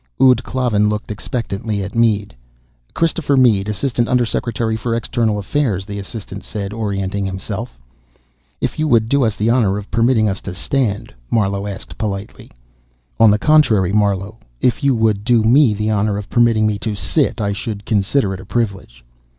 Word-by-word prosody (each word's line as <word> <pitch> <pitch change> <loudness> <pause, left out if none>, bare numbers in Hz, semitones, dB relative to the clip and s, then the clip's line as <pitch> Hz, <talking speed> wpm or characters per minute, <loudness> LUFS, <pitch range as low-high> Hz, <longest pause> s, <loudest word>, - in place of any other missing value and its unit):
Ud 125 -2 +5
Klavan 115 -5 +1
looked 105 0 -3
expectantly 105 -1 -3
at 100 - -6
Mead. 110 -4 +1 0.6
"Christopher 165 -4 +1
Mead, 105 -6 +3
Assistant 120 +2 -1
Undersecretary 115 -2 0
for 115 +1 -2
External 115 -2 0
Affairs," 105 -3 -1
the 100 0 -6
assistant 100 0 -8
said, 100 -2 -5
orientating 100 -2 -2
himself. 100 +5 -5 0.8
"If - - -2
you 155 - +1
would 115 -5 +3
do 140 0 +3
us 110 -3 +1
the 110 +2 +1
honor 110 -6 +2
of 105 -1 -8
permitting 115 -1 +3
us 95 -1 -2
to 95 - -7
stand 110 - -2
" - - -33
Marlowe 100 -2 0
asked 100 -1 -8
politely. 100 -2 -5 0.7
"On 115 -1 +7
the 105 - +4
contrary, 110 - +3
Marlowe. 100 +1 0 0.2
If 125 +4 +1
you 140 -2 +3
would 110 -3 +1
do 120 -1 +3
me 120 0 +4
the 105 +1 -1
honor 105 -1 0
of 105 -2 -7
permitting 115 -2 +3
me 105 -1 0
to 105 0 -3
sit, 110 - -1
I 100 -2 0
should 100 0 -5
consider 105 +1 +1
it 95 - -6
a - - -11
privilege." 95 - -3
110 Hz, 175 wpm, -18 LUFS, 100-120 Hz, 0.8 s, On